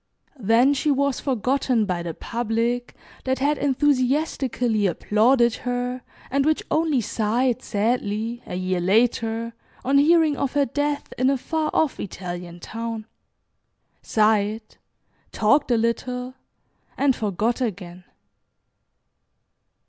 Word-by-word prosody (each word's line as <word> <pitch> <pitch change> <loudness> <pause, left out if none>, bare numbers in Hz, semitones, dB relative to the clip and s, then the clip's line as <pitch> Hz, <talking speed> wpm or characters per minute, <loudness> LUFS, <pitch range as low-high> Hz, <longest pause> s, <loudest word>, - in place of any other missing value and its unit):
Then 235 +5 +4
she 285 +2 0
was 280 -1 +1
forgotten 255 -2 0
by 180 -3 -2
the 170 -2 -5
public 235 +1 -2 0.3
that 260 0 0
had 285 +3 +1
enthusiastically 260 -5 +1
applauded 235 +6 +3
her, 245 0 -3 0.3
and 275 +1 +2
which 310 +2 +1
only 310 -5 +2
sighed 230 +3 0
sadly, 225 +1 -1
a - - -5
year 185 0 -1
later, 225 +3 +1 0.3
on 275 +2 +4
hearing 315 0 +4
of 275 - -2
her 285 -1 +3
death, 290 +3 -2
in 255 +1 +3
a 275 - +2
far 315 +3 -2
off 310 -4 +1
Italian 175 -2 -6
town, 225 +3 -5 1.0
sighed, 215 0 +1 0.5
talked 270 +8 +2
a 240 - +3
little, 250 +2 -2 0.6
and 275 -2 +3
forgot 215 +4 -1
again. 180 -6 -4
240 Hz, 115 wpm, -23 LUFS, 215-275 Hz, 1.0 s, Then